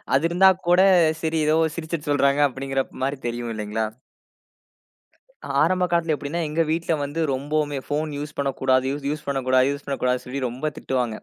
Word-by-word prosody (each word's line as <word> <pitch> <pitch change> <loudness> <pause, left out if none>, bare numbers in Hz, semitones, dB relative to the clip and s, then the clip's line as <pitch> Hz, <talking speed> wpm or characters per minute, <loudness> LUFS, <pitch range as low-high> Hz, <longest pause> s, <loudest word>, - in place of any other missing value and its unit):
அது 140 - +2
இருந்த 190 +3 +6 0.2
கூட 180 +1 +6 0.4
சரி, 160 0 0
ஏதோ 155 - +4 0.2
சிரிச்சுட்டு 160 -2 -4
சொல்றங்க 140 0 +3
அப்பிடிங்கிறமாரி 135 +1 -3
தெரியும் 120 0 -4
இல்லேங்களா! 105 +1 -2 1.8
ஆரம்ப 185 +3 +2
காலத்துல 170 -2 +2
எப்பிடின்னா, 145 +4 -4
எங்க 160 +2 0
வீட்ல 165 +1 0
வந்து 145 +3 -4
ரொம்பவுமே 145 +2 -1
ஃபோன் 155 +2 -2
யூஸ் 145 +1 -6
பண்ணக்கூடாது, 130 -1 +1 0.2
யூஸ் 150 +1 -4
பண்ணக்கூடாது, 130 -1 +2
யூஸ் 140 0 -6
பண்ணக்கூடாது 125 -2 -1
சொல்லி 135 +2 -4
ரொம்ப 130 +6 -3
திட்டுவாங்க 125 -4 -2
140 Hz, 145 wpm, -23 LUFS, 130-155 Hz, 1.8 s, இருந்த